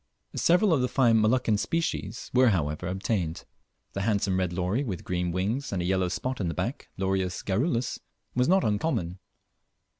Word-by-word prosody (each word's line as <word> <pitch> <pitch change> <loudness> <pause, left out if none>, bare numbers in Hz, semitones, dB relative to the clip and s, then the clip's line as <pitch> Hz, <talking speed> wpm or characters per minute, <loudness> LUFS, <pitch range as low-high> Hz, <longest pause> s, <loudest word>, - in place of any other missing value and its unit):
Several 180 +2 +4
of 140 - +2
the 125 - +2
fine 120 -3 +3
Moluccan 110 -1 +2
species 120 -11 -2
were 125 0 +6
however 80 -3 -1
obtained. 95 -3 -2 0.5
The 100 - -2
handsome 100 -3 +1
red 90 -2 0
lory 90 +9 0
with 95 - -4
green 90 -1 -1
wings 105 +11 -1
and 95 - -1
a 85 - -1
yellow 95 0 +1
spot 125 +7 -3
in 90 - 0
the 85 - -3
back - - -3
(Lorius 95 -1 -1
garrulus), 120 - 0 0.3
was 125 0 +2
not 190 +2 +4
uncommon. 105 - -1
100 Hz, 170 wpm, -27 LUFS, 90-125 Hz, 0.5 s, were